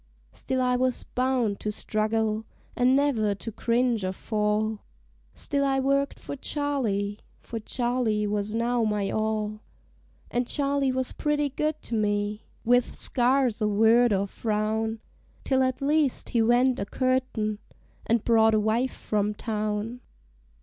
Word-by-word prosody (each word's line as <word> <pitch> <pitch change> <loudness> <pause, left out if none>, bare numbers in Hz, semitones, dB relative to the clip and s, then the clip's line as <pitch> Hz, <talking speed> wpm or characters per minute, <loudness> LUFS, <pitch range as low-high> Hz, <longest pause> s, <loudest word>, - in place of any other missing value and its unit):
Still 260 -1 -2
I 250 0 +2
was 255 0 0
bound 250 -5 0
to 210 - -2
struggle, 215 +1 -1 0.3
an' 255 +1 +4
never 235 -8 +2
to 225 +3 -7
cringe 235 0 +1
or 185 0 -1
fall 210 +1 -1 0.6
Still 280 -1 -1
I 270 -1 +2
worked 275 +1 +1
for - - -6
Charley, 245 -9 -1 0.2
for 230 - -6
Charley 240 -2 0
was 205 +1 -2
now 235 +1 +1
my 210 -2 0
all; 215 -1 -1 0.7
And 245 0 0
Charley 280 -1 +1
was 260 0 -2
pretty 295 -1 0
good 305 +3 -2
to - - -7
me, 210 -1 -1 0.2
with 245 +1 +3
scarce 250 -2 +1
a 215 - +2
word 225 +3 +4
or 200 0 +2
frown, 220 +1 -2 0.4
Till 265 -1 +2
at 260 +1 0
last 295 -2 +1
he 235 - +2
went 245 +3 +3
a 200 - -2
courtin', 255 -5 0 0.5
and 230 -1 +2
brought 225 -1 +4
a - - +4
wife 225 +5 0
from 210 0 -1
town. 215 +2 -3
230 Hz, 145 wpm, -26 LUFS, 215-255 Hz, 0.7 s, an